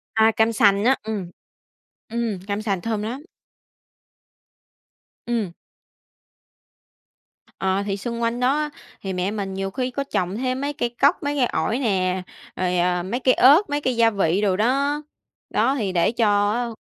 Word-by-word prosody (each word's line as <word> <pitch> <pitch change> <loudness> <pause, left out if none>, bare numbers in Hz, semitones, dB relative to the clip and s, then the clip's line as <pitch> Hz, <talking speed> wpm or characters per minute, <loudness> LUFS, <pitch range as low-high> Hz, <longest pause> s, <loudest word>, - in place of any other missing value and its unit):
À, 220 0 +5
cam 225 +1 +2
sành 200 -3 +4
á. 265 +2 +5
Ừm, 210 -5 -4 0.8
ừm, 230 -4 -2
cam 205 0 -2
sành 195 -5 -1
thơm 220 -2 -2
lắm. 235 +6 -4 2.0
Ừm. 230 -6 -1 2.1
Ờ, 190 +1 0
thì 200 -1 -2
xung 235 +3 -4
quanh 230 +1 0
đó 255 +3 +2
á 300 0 -1 0.3
thì 195 -1 -4
mẹ 180 +2 -1
mình 200 -3 -4
nhiều 195 0 -3
khi 255 +3 -2
có 275 +3 -2
trồng 185 -8 -2
thêm 255 +1 -2
mấy 285 +1 -2
cây 260 -5 -1
cóc, 275 +4 +2
mấy 290 0 -1
cây 255 - +3
ổi 235 0 -1
nè, 185 -6 0 0.3
rồi, 180 -1 0
ờ, 180 0 +1
mấy 200 +7 -3
cây 255 0 +4
ớt, 295 +11 +6
mấy 290 0 -1
cây 255 -2 0
gia 230 -1 +5
vị 195 -3 +1
đồ 195 -3 +2
đó. 275 +7 +1 0.5
Đó, 270 - +2
thì 210 -8 -1
để 175 +2 +2
cho 205 -3 +2
á 240 +1 -1
220 Hz, 170 wpm, -23 LUFS, 195-255 Hz, 2.1 s, ớt